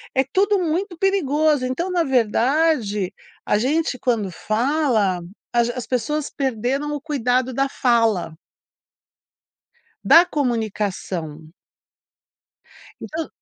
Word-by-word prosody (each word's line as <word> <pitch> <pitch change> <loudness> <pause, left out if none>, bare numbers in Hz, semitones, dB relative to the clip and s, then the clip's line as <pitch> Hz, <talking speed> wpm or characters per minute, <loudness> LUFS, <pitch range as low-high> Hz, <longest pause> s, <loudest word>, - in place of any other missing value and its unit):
É 265 - +4
tudo 395 +9 +1
muito 350 +2 -2
perigoso. 310 -7 +1
Então, 335 +9 -2
na 350 -2 +2
verdade, 240 - +1 0.3
a 210 - +2
gente 275 +3 0
quando 220 -6 0
fala, 220 - 0 0.3
a 240 - +4
g 240 +1 -2
as 250 - -5
pessoas 280 +5 -1
perderam 270 +3 -2
o 290 - -6
cuidado 255 -4 0
da 275 +3 +1
fala. 225 - +1 1.7
Da 340 +2 +8
comunicação. 200 - -3 1.5
Então 320 0 -5
260 Hz, 105 wpm, -21 LUFS, 220-305 Hz, 1.7 s, Da